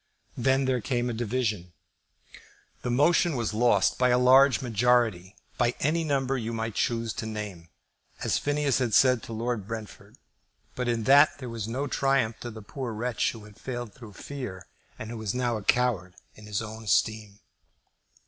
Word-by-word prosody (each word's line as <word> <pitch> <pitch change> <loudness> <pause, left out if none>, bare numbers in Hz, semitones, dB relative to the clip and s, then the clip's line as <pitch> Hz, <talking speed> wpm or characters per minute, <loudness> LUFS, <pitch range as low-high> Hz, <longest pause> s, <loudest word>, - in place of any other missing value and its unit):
Then 135 +2 +2
there 130 -2 0
came 120 +1 -1
a - - -4
division. 110 -6 -2 1.1
The - - -3
motion 155 +5 +3
was 115 -4 -2
lost 120 +2 +2
by 125 0 +4
a 125 - +4
large 130 +2 +6
majority, 115 -6 +1 0.2
by 120 -1 +2
any 160 +4 +1
number 135 -3 0
you 115 0 -4
might 115 -1 -3
choose 115 0 -1
to 110 - -5
name, 105 -6 -6 0.5
as - - +1
Phineas 145 -2 +1
had 120 -5 +1
said 125 -3 +5
to - - -10
Lord 115 -2 -3
Brentford; 110 -2 -8 0.6
but 125 -1 -3
in 115 -2 0
that 140 +5 +6
there 130 -3 -7
was 115 -2 -5
no 130 +5 -2
triumph 135 -5 +1
to 120 - -6
the 110 -2 -10
poor 125 +1 -5
wretch 120 +2 -1
who 110 -2 -11
had 105 0 -16
failed 120 -4 -5
through 115 -4 -12
fear, 105 -8 -7 0.3
and 110 +1 -7
who 120 - -6
was 110 0 -3
now 120 -2 0
a 110 - -4
coward 100 -7 +1 0.2
in 105 0 -14
his 105 +1 -2
own 110 0 -8
esteem. 105 -1 0
120 Hz, 175 wpm, -27 LUFS, 110-130 Hz, 1.1 s, large